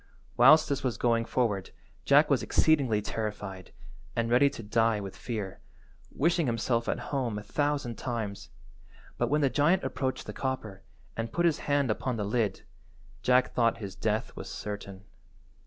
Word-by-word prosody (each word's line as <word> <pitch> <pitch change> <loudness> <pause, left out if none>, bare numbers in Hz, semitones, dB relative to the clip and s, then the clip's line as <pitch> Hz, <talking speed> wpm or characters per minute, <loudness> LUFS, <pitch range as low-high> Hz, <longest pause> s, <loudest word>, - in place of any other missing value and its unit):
Whilst 150 +6 +7
this 140 - -2
was 125 -3 -1
going 115 -1 +1
forward 105 -7 -1 0.4
Jack - - +6
was - - +3
exceedingly 130 -10 +2
terrified, 105 -4 -5 0.4
and 115 0 0
ready 135 +4 +5
to 115 - -9
die 115 +1 +2
with 95 -2 -7
fear, 105 -5 -5 0.5
wishing 165 0 +1
himself 115 0 0
at - - 0 0.2
home 125 -6 -1
a 105 - -6
thousand 145 0 -1
times, 110 -5 -4 0.7
but - - +1
when 150 +1 +2
the 140 - +3
giant 160 +5 +3
approached 130 0 -2
the - - -6
copper, 110 -8 -4 0.3
and 115 0 -3
put 175 +6 +1
his 165 -4 +2
hand 140 -4 +2
upon 125 +3 -2
the 105 - -2
lid, 105 -2 -1 0.6
Jack 125 0 +3
thought 115 -1 +2
his 100 -4 -7
death 110 +2 -2
was - - -7
certain. 100 -2 -7
115 Hz, 160 wpm, -29 LUFS, 105-135 Hz, 0.7 s, Whilst